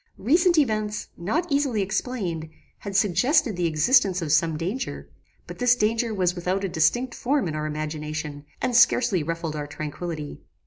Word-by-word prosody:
Recent 340 - +3
events, 215 -7 0
not 255 - -1
easily 275 -7 +1
explained, 190 -6 -3 0.3
had 200 -1 -7
suggested 220 - +3
the 175 -1 0
existence 180 - +3
of 160 -4 -3
some 160 0 +2
danger; 190 +11 -4 0.3
but - - -10
this 245 0 +4
danger 225 +1 0
was 185 -4 +1
without 185 +2 -2
a 195 - -1
distinct 210 +10 +1
form 270 -4 0
in 155 - -3
our 155 0 -2
imagination, 150 -1 -5 0.2
and 255 -2 0
scarcely 235 -5 +4
ruffled 165 0 -3
our 145 -1 -4
tranquillity. 150 +1 -6
190 Hz, 155 wpm, -25 LUFS, 160-245 Hz, 0.3 s, this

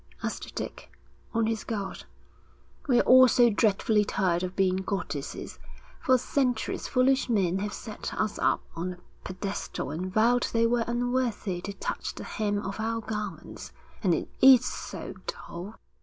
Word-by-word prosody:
asked - - -4
Dick, - - -6 0.4
on 230 -1 +1
his 220 -1 -1
guard. 205 -4 -4 0.8
'We're 245 -3 +4
all 255 0 +8
so 240 -1 +5
dreadfully 210 0 +3
tired 185 -4 0
of 185 0 -4
being 185 -1 +2
goddesses. 185 -7 -4 0.4
For 260 -5 +4
centuries 250 -2 -1
foolish 260 +1 +2
men 190 -5 +2
have 205 +1 -2
set 215 0 -6
us 215 -1 -1
up - - +2
on 180 +2 -3
a - - -14 0.3
pedestal 185 -6 -4
and 180 +5 -4
vowed 235 +4 +3
they 230 0 +3
were 230 0 +2
unworthy 240 -6 -1
to 200 +2 -5
touch - - -4
the - - -7
hem 205 -1 -1
of 195 +2 -5
our 225 +1 -1
garments. 210 -2 -6 0.3
And 180 -6 +3
it - - -3
is 260 -2 +8
so - - -5
dull.' 220 - -6
215 Hz, 155 wpm, -28 LUFS, 190-245 Hz, 0.8 s, all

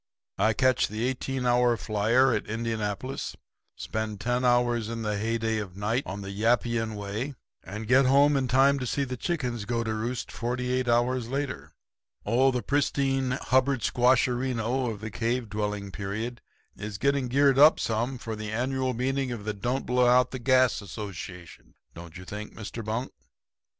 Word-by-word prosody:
'I 110 - +3
catch 130 +3 +3
the 110 +2 -4
eighteen 130 0 -2
hour 120 -1 +3
flyer 115 +6 +2
at 110 - -2
Indianapolis, 110 +2 -3 0.4
spend 110 -2 -4
ten 125 +3 0
hours 120 -2 +2
in 115 -1 -4
the 105 -1 -1
heyday 110 +1 -1
of 95 -3 -7
night 110 +5 0
on 100 +1 -5
the 100 0 -6
Yappian 115 +1 +1
Way, 105 +7 -4 0.3
and 105 +4 -7
get 130 +2 +5
home 140 +2 +5
in 135 -2 +1
time 135 +3 +4
to 125 - -3
see 140 - 0
the 130 -1 -4
chickens 125 - -2
go 115 +1 -1
to 110 -1 -2
roost 115 +3 -3
forty 125 +1 -2
eight 130 -1 0
hours 120 0 +1
later. 140 0 -4 0.5
Oh, 125 +5 +4
the 125 -2 -1
pristine 135 -2 +1
Hubbard 130 0 +2
squasherino 125 0 +1
of 105 -2 -8
the 110 0 -5
cave 115 +2 -1
dwelling 105 -1 -3
period 110 +5 -4 0.3
is 105 -1 -6
getting 140 +3 +1
geared 135 +1 +3
up 150 +2 +7
some 115 +4 -1
for 115 -2 -5
the 105 0 -5
annual 130 +2 -1
meeting 135 +1 -1
of 110 -4 -6
the 105 - -1
Don't 120 +6 -2
Blow 125 0 +3
Out 125 +1 +4
the 130 - -5
Gas 130 -1 +3
Association, 95 -4 -8 0.2
don't 85 0 -10
you 90 - -10
think, 105 +3 -7
Mr. 110 +1 -6
Bunk?' 110 +4 -3
120 Hz, 170 wpm, -27 LUFS, 110-130 Hz, 0.5 s, up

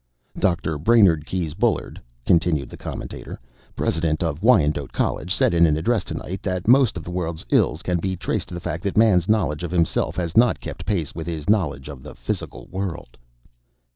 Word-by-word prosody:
"Dr. 80 -4 0
Brainard 90 -5 +4
Keyes 85 -5 -2
Bullard," 110 +5 -1 0.2
continued 80 -4 +2
the - - -10
commentator, - - -7 0.4
"President 80 0 0
of 80 -1 -2
Wyandotte 75 - +3
College, 90 - -2
said 95 - +2
in 85 0 +5
an 75 -1 +1
address 110 +8 +1
tonight 95 +2 -6
that 95 0 -3
most 125 -5 +5
of 85 - -6
the 90 - -7
world's 85 -3 -3
ills 80 - +2
can 90 -1 0
be 95 +2 -2
traced 90 - -2
to 90 - -8
the - - -4
fact 85 0 -4
that 100 - -2
Man's 100 -5 +4
knowledge 80 -9 +1
of 90 - -3
himself 85 -1 0
has 85 -2 -3
not 120 +1 +4
kept - - -8
pace 90 -8 -1
with 80 0 -6
his 80 -3 -5
knowledge 75 -10 +1
of 70 -3 -9
the 75 - -11
physical - - -5
world." 95 -9 -5
85 Hz, 190 wpm, -23 LUFS, 80-95 Hz, 0.4 s, in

